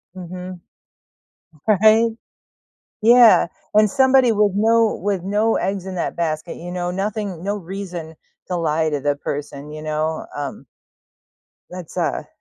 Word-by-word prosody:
Mhm. 180 0 -8 1.1
Right. 220 +2 +5 0.9
Yeah, 235 -5 +7 0.3
and 215 -1 +5
somebody 260 -2 +4
with 210 -1 +2
no 225 +1 +3
with 195 -2 -2
no 210 +4 +1
eggs 195 0 -2
in 190 -1 -6
that - - -3
basket, 165 0 -2
you 175 +1 -8
know, 180 0 -3
nothing 195 -2 -3
no 205 +2 -2
reason 180 -3 -7 0.3
to 180 - -1
lie 160 -1 0
to 145 - -2
the 145 +1 0
person, 145 0 -6
you 155 0 -8
know. 155 +1 -2
Um 145 -1 -6 1.0
that's 180 -2 -9
a - - -1
185 Hz, 135 wpm, -21 LUFS, 160-210 Hz, 1.1 s, Yeah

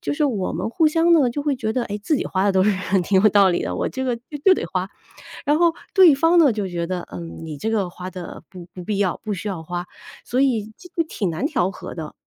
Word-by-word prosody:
就 335 - -2
是 300 - +1
我 215 -10 -1
们 180 +6 -2
互 320 +6 +3
相 330 +2 +3
呢 290 -7 +4
就 290 +4 -3
会 285 -2 0
觉 220 -3 -2
得， 245 +1 -1
哎， 205 -1 -5
自 300 +8 +1
己 - - -2
花 190 0 0
的 200 - +3
都 190 0 +3
是 210 - +4 0.3
挺 190 +1 +3
有 215 - +7
道 200 -1 +5
理 175 - 0
的， - - -3
我 - - -1
这 260 - -4
个 250 -2 0
就 230 - -18 0.2
就 385 - +7
得 - - -3
花， 185 0 -2 0.6
然 295 +1 +3
后 340 0 +4 0.2
对 375 -6 +8
方 330 +5 +3
呢， 300 -6 +6
就 205 -2 -2
觉 170 -2 -3
得， 180 -1 -4
嗯， 165 -1 -8
你 155 -2 -6
这 220 - -2
个 205 -5 0
花 180 +1 -8
的 185 -2 -9
不 180 -2 -10
不 180 - -8
必 205 +3 -2
要， 190 -4 0
不 215 - -2
需 195 +2 -5
要 185 -5 -4
花， 175 +2 -4 0.4
所 255 +2 0
以 225 -6 +1
这 360 - -14
个 330 - +2
挺 200 - -2
难 165 - -2
调 240 - 0
和 - - -9
的。 160 -3 -7
210 Hz, 300 characters per minute, -22 LUFS, 185-285 Hz, 0.6 s, 对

